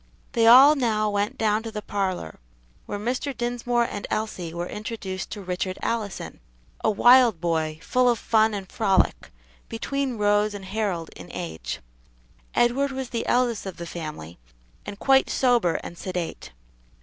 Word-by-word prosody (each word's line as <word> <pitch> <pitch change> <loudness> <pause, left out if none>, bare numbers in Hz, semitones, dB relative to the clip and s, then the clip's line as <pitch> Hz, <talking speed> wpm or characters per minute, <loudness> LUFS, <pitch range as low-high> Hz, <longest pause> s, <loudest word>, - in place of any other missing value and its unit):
They 230 -3 +3
all 265 +5 +9
now 215 -5 +1
went 205 +5 -1
down 215 -1 +1
to 225 - -6
the 210 -1 -6
parlor, 185 - -3 0.5
where - - -3
Mr. 250 +5 -3
Dinsmore 240 0 0
and 205 -3 -5
Elsie 210 -6 -3
were 170 +1 -4
introduced 205 -2 -5
to 205 -2 -7
Richard 185 +1 -3
Allison, 210 - -3 0.4
a - - +3
wild 240 -2 +6
boy 160 -2 -1
full 250 0 +3
of 240 - +2
fun 220 0 +2
and 195 -2 -6
frolic, 195 - +1 0.4
between 265 +2 -2
Rose 205 0 +2
and 195 -1 -8
Harold 190 -5 -2
in 90 - -11
age. 80 -1 -5 0.7
Edward 265 +4 +2
was 265 -2 -5
the 230 -1 -3
eldest 240 -5 +1
of 190 - -7
the 170 - -6
family, 155 - -7 0.5
and 200 - -6
quite 270 +4 +3
sober 240 -10 +2
and 170 - -8
sedate. 180 -3 -5
210 Hz, 155 wpm, -25 LUFS, 185-240 Hz, 0.7 s, all